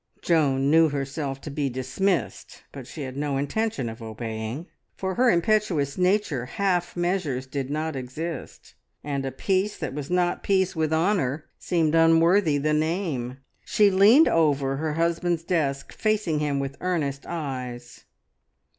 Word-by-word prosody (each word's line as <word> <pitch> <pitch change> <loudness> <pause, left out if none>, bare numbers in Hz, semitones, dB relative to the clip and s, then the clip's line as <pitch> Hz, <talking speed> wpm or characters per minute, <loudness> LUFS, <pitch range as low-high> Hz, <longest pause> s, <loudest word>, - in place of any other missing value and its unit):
Joan 140 -4 +2
knew 160 0 +6
herself 140 -1 -4
to 150 - -7
be 140 -1 -1
dismissed, 130 +9 -2
but 135 -3 -9
she 150 - -7
had 130 -1 -6
no 140 -1 -1
intention 145 - -1
of 115 +1 -7
obeying. 110 +5 -5 0.3
For 190 0 -3
her 250 +5 +3
impetuous 175 -7 +1
nature 180 - +1
half 180 +1 -1
measures 175 -8 -1
did 135 0 -4
not 155 +1 -2
exist, 135 +4 -6 0.3
and 140 -2 -2
a - - -3
peace 190 +9 0
that - - -4
was 145 0 -5
not 180 0 +1
peace 190 -1 +1
with 160 -1 0
honour 160 -4 +1
seemed 165 -4 +1
unworthy 165 0 +4
the 150 +2 0
name. 150 -6 -2 0.2
She 205 -1 +3
leaned 210 +11 +6
over 140 -4 +2
her 155 +1 -2
husband's 170 +1 0
desk, 150 -6 -1
facing 210 -8 0
him 145 -2 0
with 140 0 -4
earnest 150 -7 -2
eyes. 125 -7 -6
155 Hz, 145 wpm, -25 LUFS, 135-180 Hz, 0.3 s, knew